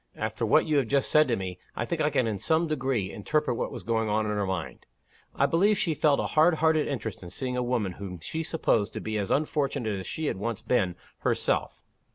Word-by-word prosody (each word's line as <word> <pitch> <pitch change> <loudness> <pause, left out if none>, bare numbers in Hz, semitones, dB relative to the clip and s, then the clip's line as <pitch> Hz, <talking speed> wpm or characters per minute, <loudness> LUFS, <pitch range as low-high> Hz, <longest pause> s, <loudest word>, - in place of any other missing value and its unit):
After - - -2
what - - +5
you 155 -2 +2
have 135 -5 +2
just 140 +2 +1
said 155 0 +5
to 120 - +1
me, 95 -2 -5 0.2
I - - -2
think 160 +5 -2
I 150 - +3
can 140 -4 +1
in 105 -3 -2
some 160 - +2
degree 130 - -1
interpret 140 +5 0
what - - -2
was - - -7
going 110 +1 0
on 110 +1 +1
in 105 - -1
her 105 -2 -1
mind. 95 0 -4 0.5
I 140 - +3
believe 190 +8 +3
she 165 - +1
felt 150 -1 +3
a - - 0
hard 160 +2 +5
hearted 160 -1 +2
interest 115 -6 -4
in 90 - -8
seeing 125 +7 -3
a 125 - 0
woman 120 -6 0
whom 90 -1 -7
she 160 - -4
supposed 115 -10 0
to - - -4
be 110 -1 -2
as 100 - -2
unfortunate 140 -8 0
as 95 - -7
she 160 - -3
had 120 - -1
once 115 +2 -3
been 95 -8 +1 0.2
herself. - - -1
125 Hz, 235 wpm, -27 LUFS, 105-155 Hz, 0.5 s, what